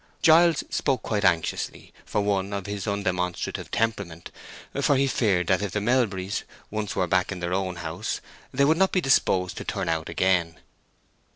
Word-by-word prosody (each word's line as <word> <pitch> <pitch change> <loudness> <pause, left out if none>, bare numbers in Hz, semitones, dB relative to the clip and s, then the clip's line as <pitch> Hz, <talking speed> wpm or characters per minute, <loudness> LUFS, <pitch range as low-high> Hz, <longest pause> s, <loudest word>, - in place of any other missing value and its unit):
Giles 165 0 +6
spoke 130 -5 0
quite 105 -2 -1
anxiously 85 -4 0
for 105 - 0
one 100 -1 0
of 100 -2 -3
his 100 0 -4
undemonstrative 95 -3 -2
temperament; 100 -7 -2 0.5
for 145 - +3
he 135 +1 +3
feared 100 -9 +1
that 95 +3 +2
if 105 -2 -3
the 105 - 0
Melburys 105 -4 0 0.3
once 110 -1 -3
were 90 - +1
back 95 +2 +1
in 95 - -4
their 85 0 -2
own 95 -1 -1
house 80 -1 -4 0.3
they 140 +2 +3
would 160 +3 +3
not 190 +1 +3
be 185 - +2
disposed 95 - +2
to - - -4
turn - - -3
out 80 -1 -1
again. 85 -1 +1
100 Hz, 175 wpm, -25 LUFS, 90-115 Hz, 0.5 s, Giles